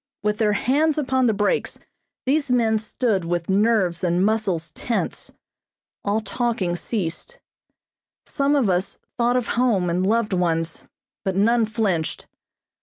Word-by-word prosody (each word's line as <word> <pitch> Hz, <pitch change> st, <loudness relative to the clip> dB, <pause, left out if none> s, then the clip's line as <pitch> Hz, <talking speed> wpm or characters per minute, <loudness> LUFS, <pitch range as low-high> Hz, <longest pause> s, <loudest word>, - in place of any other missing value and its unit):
With 210 Hz, +1 st, 0 dB
their 210 Hz, -2 st, +3 dB
hands 295 Hz, +7 st, +2 dB
upon 260 Hz, -3 st, +2 dB
the -, -, +4 dB
brakes 205 Hz, 0 st, 0 dB, 0.5 s
these 280 Hz, +1 st, +1 dB
men 225 Hz, -3 st, +2 dB
stood 215 Hz, -2 st, 0 dB
with 170 Hz, +1 st, -2 dB
nerves 195 Hz, -4 st, +2 dB
and 180 Hz, +1 st, +2 dB
muscles 200 Hz, -7 st, 0 dB
tense. 235 Hz, -, -3 dB, 0.7 s
All 205 Hz, +2 st, 0 dB
talking 215 Hz, -4 st, -1 dB
ceased. 205 Hz, -, -3 dB, 0.9 s
Some 280 Hz, 0 st, +1 dB
of 270 Hz, -6 st, +2 dB
us 185 Hz, +1 st, 0 dB, 0.2 s
thought 240 Hz, +1 st, +3 dB
of 245 Hz, -, -2 dB
home 215 Hz, -8 st, +2 dB
and 180 Hz, +2 st, 0 dB
loved 215 Hz, +1 st, +1 dB
ones, 165 Hz, -3 st, -1 dB, 0.4 s
but 190 Hz, -3 st, -1 dB
none 225 Hz, +3 st, +3 dB
flinched. 200 Hz, -8 st, -1 dB
215 Hz, 135 wpm, -23 LUFS, 185-240 Hz, 0.9 s, the